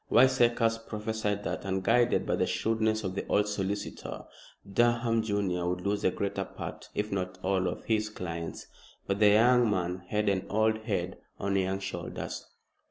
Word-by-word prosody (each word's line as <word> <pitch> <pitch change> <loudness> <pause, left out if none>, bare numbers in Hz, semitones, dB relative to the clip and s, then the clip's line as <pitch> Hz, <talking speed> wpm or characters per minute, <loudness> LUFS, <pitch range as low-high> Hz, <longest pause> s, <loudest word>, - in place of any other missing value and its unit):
Wiseacres 120 -3 +4
prophesied 105 -2 -3
that, - - -3
unguided 105 +6 +2
by - - +1
the - - +1
shrewdness 110 -1 0
of 95 -2 -2
the 100 - -3
old 105 0 +2
solicitor, 100 0 -3 0.4
Durham 120 +2 +2
junior, 100 -5 0
would 90 0 -2
lose 100 +1 0
the - - +3
greater 100 +1 -2
part, - - -8
if 105 +1 -1
not 90 -1 -2
all, 95 -1 +1
of - - -4
his 110 -1 0
clients. 85 -5 -5 0.4
But 100 0 -1
the 105 -1 +7
young 120 +3 +5
man 90 -2 -1
had 105 +2 0
an 95 -2 +1
old 110 +1 +2
head 95 -5 -2 0.2
on 100 0 -1
young 95 0 0
shoulders. 95 0 -5
105 Hz, 165 wpm, -29 LUFS, 95-110 Hz, 0.4 s, the